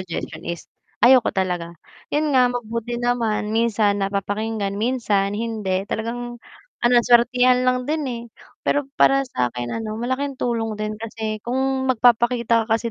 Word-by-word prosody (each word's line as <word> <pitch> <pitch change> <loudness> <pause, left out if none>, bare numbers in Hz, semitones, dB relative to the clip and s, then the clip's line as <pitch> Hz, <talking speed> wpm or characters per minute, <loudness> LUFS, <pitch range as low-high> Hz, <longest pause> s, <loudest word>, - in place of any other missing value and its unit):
suggestion 180 -3 -6
is 170 -1 -5 0.3
ayoko 245 0 +6
talaga, 175 -3 -2 0.3
yun 295 -1 0
nga, 250 -1 +5
mabuti 235 0 -4
naman 230 -3 0
minsan 215 -3 +2
napapakinggan, 200 +1 -2
minsan 210 -3 0
hindi, 205 -3 -2
talagang 240 +2 -4 0.4
ano 240 - +4
lang, 240 -1 +4
suwertehan 250 +1 +5
lang 250 0 +1
din, 310 +1 -1
eh, 235 -1 -5 0.4
pero 290 - +2 0.2
para 275 0 +5
sa'kin 125 - -3
ano, 220 -1 -4
malaking 260 +5 -2
tulong 230 -3 -2
din 215 0 -2
kasi 220 -1 -4
kung 265 +2 -1
magpapakita 235 -2 +3
ka 225 - +2
kasi 230 0 -4
230 Hz, 145 wpm, -22 LUFS, 210-245 Hz, 0.4 s, ayoko